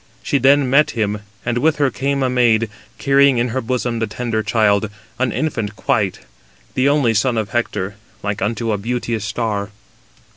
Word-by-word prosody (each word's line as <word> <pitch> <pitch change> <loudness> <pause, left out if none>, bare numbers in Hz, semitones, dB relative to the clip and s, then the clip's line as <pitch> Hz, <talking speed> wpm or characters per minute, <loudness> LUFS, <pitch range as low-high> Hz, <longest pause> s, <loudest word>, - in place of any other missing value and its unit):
She 140 - +1
then 135 +1 +4
met 140 +4 +4
him; 105 -1 0 0.3
and 120 0 0
with 155 +4 +3
her 140 -3 +1
came 140 +2 -1
a - - +2
maid, 115 -4 +2 0.3
carrying 140 -1 +4
in 120 +1 +1
her 130 +3 -2
bosom 120 -1 -2
the 110 - 0
tender 110 +1 -2
child, 105 -1 +2 0.3
an 130 -2 +1
infant 115 -10 -2
quite, 100 -1 0 0.5
the 130 +2 +2
only 140 -6 +3
son 115 +3 +1
of 110 -1 -1
Hector, 105 -4 -2 0.3
like 100 0 -2
unto 115 +2 -1
a 105 - -1
beauteous 115 -1 -2
star. 100 -1 -2
115 Hz, 175 wpm, -19 LUFS, 105-130 Hz, 0.5 s, then